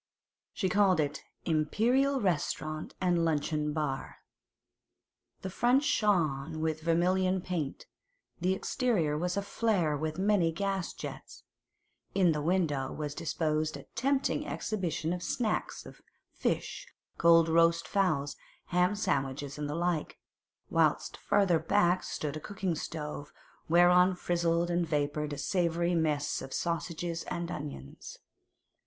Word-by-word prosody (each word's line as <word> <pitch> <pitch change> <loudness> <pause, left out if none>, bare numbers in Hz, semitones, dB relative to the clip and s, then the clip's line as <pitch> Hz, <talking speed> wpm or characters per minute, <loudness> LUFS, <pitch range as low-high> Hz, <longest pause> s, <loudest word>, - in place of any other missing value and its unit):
She 190 - -1
called 190 -2 +3
it 145 -1 -1 0.2
'Imperial 240 - +2
Restaurant 155 -4 -2
and 175 -2 +2
Luncheon 150 -1 0
Bar.' 150 -3 -3 1.3
The 190 - -4
front 245 +8 +3
shone 165 - +1
with 160 0 -1
vermilion 185 +3 +2
paint; 170 -6 -4 0.5
the 185 +2 +1
interior 190 - 0
was 180 +4 -1
aflare 200 -6 +1
with 155 +2 -3
many 190 -4 +2
gas 195 +1 -2
jets; - - -8 0.7
in 185 -4 +4
the 150 -1 -1
window 150 -5 0
was 150 -2 -4
disposed 155 -1 -1
a - - -11
tempting 270 +3 0
exhibition 175 -5 -2
of 180 - -4
'snacks' 215 +4 -2
of - - -13 0.3
fish, - - -2 0.3
cold 165 -1 +6
roast 165 +1 +3
fowls, 155 -8 +1 0.3
ham 180 +3 +2
sandwiches, 140 -7 -2
and 145 -1 -3
the 150 - -3
like; 170 -2 -1 0.5
whilst - - +2
farther 195 -5 +2
back 185 -1 +2
stood 150 -1 -4
a - - -4
cooking 190 +1 -3
stove, 150 -2 -5 0.4
whereon 180 +2 +5
frizzled 170 -1 0
and 175 -1 +1
vapoured 150 0 -1
a - - -5
savoury 170 +1 0
mess 155 -4 0
of 135 - -8
sausages 170 0 -2
and 170 0 -4
onions. 140 - -7
170 Hz, 125 wpm, -30 LUFS, 155-185 Hz, 1.3 s, cold